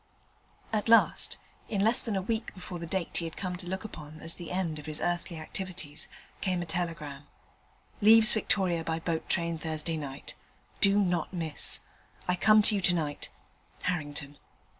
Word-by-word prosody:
At 215 +1 0
last, 230 - +5 0.3
in 200 -3 0
less 225 +4 +4
than 220 -4 -2
a 190 - 0
week 220 +2 -2
before 180 -1 -7
the 170 - -5
date 185 0 -2
he 170 - -1
had 165 - -6
come 185 -2 -2
to 175 -1 -6
look 190 +2 -3
upon 155 -7 -9
as 165 +1 0
the 175 -2 -7
end 175 -4 -1
of 150 - -10
his 155 0 -1
earthly 175 0 -1
activities, 165 -1 -4 0.3
came 185 -2 0
a - - -6
telegram: 160 -4 -3 0.7
'Leaves 220 +1 +7
Victoria 185 -6 +1
by 160 0 -1
boat 165 -1 -2
train 170 -2 +2
Thursday 160 +1 -1
night. 140 -3 -6 0.5
Do 200 0 +6
not 180 -4 +1
miss. 165 -4 -1 0.5
I 180 - +3
come 215 +3 +6
to 215 - +4
you 200 - +1
to 180 -1 +4
night. 150 -3 -2 0.5
Harrington.' 145 -5 -2
175 Hz, 175 wpm, -30 LUFS, 160-190 Hz, 0.7 s, Leaves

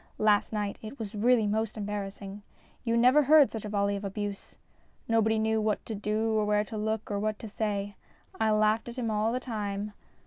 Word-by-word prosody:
Last 210 -1 +3
night 210 -2 -3
it 220 +5 -8
was 215 -2 -6
really 225 +1 +3
most 220 +1 -1
em 205 - -3
barrassing. 200 0 -5 0.4
You 230 -2 +1
never 250 +5 +6
heard 295 0 +6
such 220 -2 -5
a - - -4
volley 200 -1 +1
of 200 - -5
abuse. 200 0 -5 0.5
Nobody 220 -1 +2
knew 220 0 +1
what 215 -1 -1
to 225 - -5
do 215 +2 -1
or 215 -1 +2
where 210 0 +2
to 215 - -8
look 215 0 -2
or 200 - -1
what 215 0 -1
to 225 - -8
say. 205 -1 -3 0.4
I 220 0 +2
laughed 215 +2 +2
at 240 - -9
him 230 -3 -1
all 215 +1 +1
the 250 - -1
time. 210 -4 -4
215 Hz, 210 wpm, -29 LUFS, 205-225 Hz, 0.5 s, never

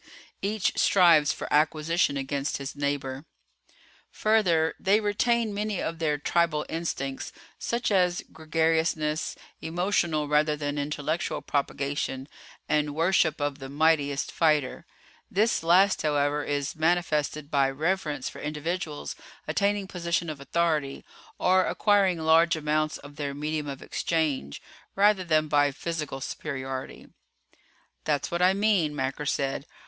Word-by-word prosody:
Each 205 -1 0
strives 170 -6 +5
for - - -5
acquisition 155 0 +2
against 140 +1 -2
his 140 0 -6
neighbor. 140 -1 -3 0.8
"Further 180 -8 +2
they 200 +2 +3
retain 220 +1 +1
many 210 -1 -2
of 165 0 -3
their 150 -3 +1
tribal 155 0 +1
instincts, 140 -5 -4 0.3
such 235 -1 -1
as 180 -3 +2
gregariousness, 160 -1 0 0.3
emotional 170 -3 0
rather 150 +1 +2
than 145 -1 -3
intellectual 150 +3 -2
propagation, 140 -1 -2 0.4
and 150 -1 0
worship 165 -1 +2
of 145 -1 -2
the 135 0 -8
mightiest 145 -1 +1
fighter. 150 -5 +1 0.4
This 215 +4 +2
last, 185 +4 +4
however, 145 -1 +1
is 145 -1 -2
manifested 155 -3 0
by 140 -2 +3
reverence 150 -1 -1
for - - -8
individuals 155 +1 -4 0.3
attaining 200 +5 +1
position 170 -3 -2
of 145 -2 -9
authority, 150 -1 -1 0.3
or 185 0 +3
acquiring 200 -4 +3
large 160 +1 +4
amounts 155 0 0
of 145 +1 -13
their 140 -2 -3
medium 150 +1 -3
of 140 -1 -6
exchange, 150 - -2 0.3
rather 200 -1 +4
than 155 -3 +2
by 145 -1 +3
physical 150 -2 -4
superiority." 135 -2 -5 1.0
"That's 145 -2 0
what 170 +1 -1
I 185 +1 +5
mean," 195 -7 +2
Macker 135 +1 -3
said. 140 0 -1
155 Hz, 125 wpm, -27 LUFS, 145-175 Hz, 1.0 s, strives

